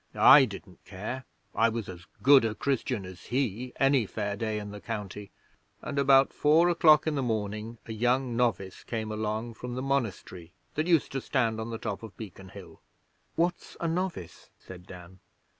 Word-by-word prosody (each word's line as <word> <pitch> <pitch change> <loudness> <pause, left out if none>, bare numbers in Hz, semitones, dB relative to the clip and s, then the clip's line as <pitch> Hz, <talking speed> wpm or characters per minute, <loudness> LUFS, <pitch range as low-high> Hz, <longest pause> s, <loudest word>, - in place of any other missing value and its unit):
I 140 - +8
didn't 100 -4 -11
care! 110 +7 -6 0.3
I 115 +1 +3
was 115 -2 -4
as 90 -2 -10 0.2
good 135 -1 +7
a 110 -1 -1
Christian 125 -4 -2
as 90 -2 -11
he 125 -1 -2
any 135 -5 +3
fair 100 -1 -3
day 110 +1 -2
in 105 -1 -6
the 105 0 -9
County, 105 -3 -6 0.5
and 140 - -4
about 135 -1 +5
four 160 +4 +4
o'clock 155 -4 +5
in 155 - 0
the 140 - -1
morning 110 -1 -3
a 110 - -6
young 125 +2 0
novice 100 -6 -1
came 110 -2 -4
along 110 +2 -3
from 120 +2 -7
the 130 - -3
monastery 100 -10 -3 0.2
that 155 +2 -1
used 165 -4 +2
to 135 - -3
stand 115 -5 0
on 110 - -5
the 115 - -4
top 100 -2 -5
of 110 -3 -11
Beacon 95 -3 -10
Hill.' - - -13 0.5
'What's 175 +1 -2
a 170 - -1
novice?' 170 - -4
said 90 -1 -13
Dan. 90 0 -12
115 Hz, 180 wpm, -28 LUFS, 105-135 Hz, 0.5 s, I